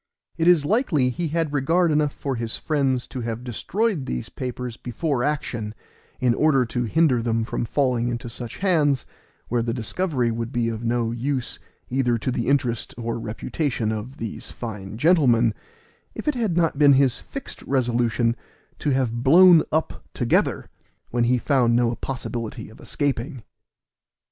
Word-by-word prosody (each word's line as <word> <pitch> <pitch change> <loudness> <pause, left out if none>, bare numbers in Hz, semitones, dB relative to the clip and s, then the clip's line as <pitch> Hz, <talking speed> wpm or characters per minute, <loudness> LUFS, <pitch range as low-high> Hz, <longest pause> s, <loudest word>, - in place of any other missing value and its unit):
It 165 - 0
is 170 -5 +5
likely 155 - +2
he 170 +6 -2
had 160 -1 -1
regard 165 +5 +2
enough 150 -1 +2
for 135 -1 -4
his 115 -1 -3
friends 135 -5 0
to 130 - -6
have 115 +1 -4
destroyed 170 - -1
these 60 -1 -3
papers 125 -2 -5
before 125 +2 -2
action, 120 -7 -2 0.4
in 125 -2 +3
order 135 -2 +3
to 120 +1 -2
hinder 135 -1 +3
them 115 -1 0
from 115 - -2
falling 125 -1 +1
into 120 0 -3
such 120 0 -7
hands, 145 - +2 0.4
where 120 0 0
the 115 0 -2
discovery 125 - -1
would 115 +1 -3
be 120 -3 0
of 115 0 -5
no 115 0 0
use 125 +2 -2 0.3
either 125 -2 +2
to 120 +3 -2
the 120 -1 -2
interest 125 -4 0
or 115 -1 -3
reputation 115 +1 -2
of 110 +5 -5
these 115 -2 -6
fine 105 -3 -7
gentlemen, 125 - +4 0.6
if - - -7
it 300 - +3
had 220 -9 -1
not 165 -4 +1
been 145 -2 +7
his 135 -2 +3
fixed 275 - -8
resolution 120 -2 +1 0.4
to 150 - -1
have 125 -4 0
blown 170 +4 +8
up 160 +1 -1
together, - - +1 0.4
when 120 0 +2
he 125 +1 +3
found 125 -2 +2
no 120 -1 +2
possibility 120 -4 -5
of 110 - -16
escaping. 135 -3 -2
125 Hz, 160 wpm, -23 LUFS, 115-150 Hz, 0.6 s, blown